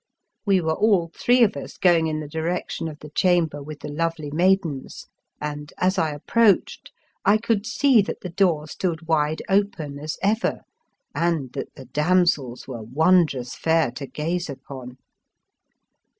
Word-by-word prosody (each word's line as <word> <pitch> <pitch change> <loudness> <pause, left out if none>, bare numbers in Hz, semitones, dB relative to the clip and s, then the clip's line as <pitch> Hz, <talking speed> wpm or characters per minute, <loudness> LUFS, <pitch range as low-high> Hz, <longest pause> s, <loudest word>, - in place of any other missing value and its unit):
We 195 -2 +4
were 160 -1 0
all 185 -4 +2
three 245 0 +4
of 210 - +2
us - - -8
going 170 -3 +4
in 155 -1 -2
the 150 - -6
direction 160 +2 -3
of 155 -2 -7
the 150 - -10
chamber 165 -3 +2
with 150 +1 -9
the - - -6
lovely 155 -1 -2
maidens, 170 -4 0 0.3
and, 150 0 -5
as 185 +1 +1
I 160 - +1
approached, 215 - +1 0.3
I 205 +2 +5
could 220 -1 -1
see 270 -6 +4
that 200 - -5
the 180 - -5
door 170 -5 +2
stood 165 0 -3
wide 155 -1 +1
open 185 -8 0
as 155 +1 -5
ever, 215 +4 +1 0.5
and 165 -7 -1
that - - -6
the 135 - -11
damsels 150 -3 +1
were 125 -4 -6
wondrous 140 0 +2
fair 160 -5 +2
to 135 +2 -7
gaze 170 +4 -3
upon. 130 -2 -9
160 Hz, 155 wpm, -23 LUFS, 145-185 Hz, 0.5 s, I